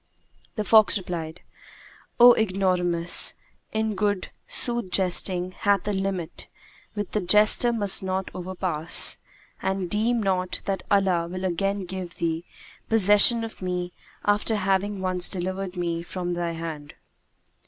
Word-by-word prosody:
The 215 Hz, -, -2 dB
fox 215 Hz, -1 st, +4 dB
replied, 175 Hz, -3 st, -6 dB, 0.8 s
"O 245 Hz, 0 st, +9 dB
ignoramus, 180 Hz, -4 st, +2 dB, 0.4 s
in 220 Hz, 0 st, -1 dB
good 205 Hz, -1 st, -2 dB, 0.2 s
sooth 240 Hz, -5 st, +2 dB
jesting 180 Hz, -1 st, +1 dB
hath 200 Hz, 0 st, 0 dB
a 210 Hz, -, -1 dB
limit 190 Hz, -4 st, -4 dB, 0.5 s
which 205 Hz, -2 st, -4 dB
the 210 Hz, -, -1 dB
jester 210 Hz, +5 st, +4 dB
must 205 Hz, -5 st, +1 dB
not 190 Hz, 0 st, -3 dB
overpass; 180 Hz, -3 st, 0 dB, 0.4 s
and 190 Hz, -2 st, -3 dB
deem 225 Hz, +2 st, 0 dB
not 185 Hz, -2 st, -2 dB
that 195 Hz, -2 st, -2 dB
Allah 190 Hz, -4 st, +1 dB
will 185 Hz, +2 st, -5 dB
again 195 Hz, +2 st, -2 dB
give 180 Hz, -1 st, -7 dB
thee 165 Hz, 0 st, -3 dB, 0.4 s
possession 220 Hz, +2 st, +5 dB
of 225 Hz, -3 st, -8 dB
me 180 Hz, -1 st, -4 dB, 0.3 s
after 205 Hz, +2 st, +1 dB
having 195 Hz, 0 st, -1 dB
once 185 Hz, -1 st, +1 dB
delivered 190 Hz, 0 st, -4 dB
me 170 Hz, -1 st, -2 dB
from 175 Hz, 0 st, -5 dB
thy 175 Hz, -1 st, -3 dB
hand." 160 Hz, -3 st, -7 dB
190 Hz, 130 wpm, -24 LUFS, 175-205 Hz, 0.8 s, O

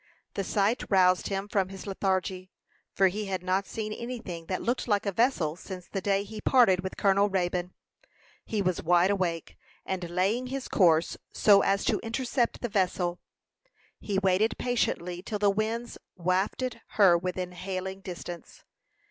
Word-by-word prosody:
The 195 Hz, -, -2 dB
sight 205 Hz, +5 st, +1 dB
roused 185 Hz, -2 st, +4 dB
him 195 Hz, 0 st, -3 dB
from 195 Hz, -3 st, 0 dB
his 190 Hz, -1 st, -9 dB
lethargy, 190 Hz, -1 st, -1 dB, 0.4 s
for 195 Hz, -, +4 dB
he 210 Hz, +3 st, -4 dB
had 190 Hz, -2 st, -3 dB
not 185 Hz, +2 st, 0 dB
seen 215 Hz, -1 st, -4 dB
any 245 Hz, +3 st, -5 dB
thing 170 Hz, -7 st, -8 dB
that 185 Hz, -, -2 dB
looked 240 Hz, +2 st, -1 dB
like 205 Hz, -2 st, +1 dB
a 200 Hz, -, 0 dB
vessel 190 Hz, -, +1 dB
since 180 Hz, 0 st, -9 dB
the 195 Hz, -, -4 dB
day 195 Hz, 0 st, +1 dB
he 210 Hz, +1 st, -8 dB
parted 235 Hz, -9 st, +5 dB
with 190 Hz, 0 st, -5 dB
Colonel 200 Hz, +1 st, +3 dB
Raybone. 180 Hz, -1 st, -1 dB, 0.7 s
He 210 Hz, -2 st, -2 dB
was 185 Hz, -2 st, 0 dB
wide 175 Hz, +3 st, +4 dB
awake; 175 Hz, -5 st, -2 dB, 0.3 s
and 185 Hz, -2 st, -3 dB
laying 195 Hz, +8 st, 0 dB
his 265 Hz, 0 st, -4 dB
course 170 Hz, -4 st, +3 dB
so 200 Hz, -2 st, +5 dB
as 195 Hz, +1 st, +1 dB
to -, -, +2 dB
intercept 240 Hz, +1 st, -1 dB
the 240 Hz, -, -1 dB
vessel, 180 Hz, -3 st, 0 dB, 0.8 s
he 200 Hz, -2 st, -2 dB
waited 195 Hz, +3 st, +2 dB
patiently 180 Hz, -8 st, -1 dB
till 210 Hz, +2 st, -4 dB
the 205 Hz, -1 st, +3 dB
winds 225 Hz, +3 st, -3 dB, 0.2 s
wafted 195 Hz, +7 st, -1 dB
her 195 Hz, -5 st, +6 dB
within 180 Hz, +1 st, -2 dB
hailing 190 Hz, +1 st, -5 dB
distance. 175 Hz, -2 st, -8 dB
195 Hz, 165 wpm, -28 LUFS, 180-210 Hz, 0.8 s, her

